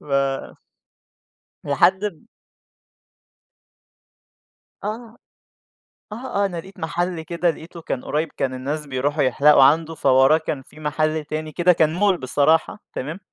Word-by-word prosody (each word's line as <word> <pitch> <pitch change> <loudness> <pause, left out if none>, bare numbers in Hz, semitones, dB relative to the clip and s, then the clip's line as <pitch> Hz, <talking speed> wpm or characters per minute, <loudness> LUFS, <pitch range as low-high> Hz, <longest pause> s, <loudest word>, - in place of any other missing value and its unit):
ف - - -19 1.6
لحد 180 +8 +2
ب 195 -1 -6 2.6
آه، 225 +2 -6 0.9
آه - - -5 0.3
آه، - - +3
أنا 180 -3 -4
لقيت 190 +4 -10
محل 175 +1 -2
كده 170 +1 -1
لقيتُه 165 +1 -7
كان 130 - -4
قريب، 155 +2 -1
كان 130 -1 -1
الناس 145 +4 -4
بيروحوا 140 +2 -1
يحلقوا 140 +2 +5
عنُده، 160 +3 +3
فَوَراه 135 +3 +4
كان 155 -3 -4
في 150 - -17
محل 155 +1 -1
تاني 155 +1 -5
كده 180 +3 +3
كان 160 -1 +2
مول 190 0 +2
بصراحة، 150 +8 +1
تمام. 155 +8 -5
155 Hz, 125 wpm, -22 LUFS, 145-175 Hz, 2.6 s, يحلقوا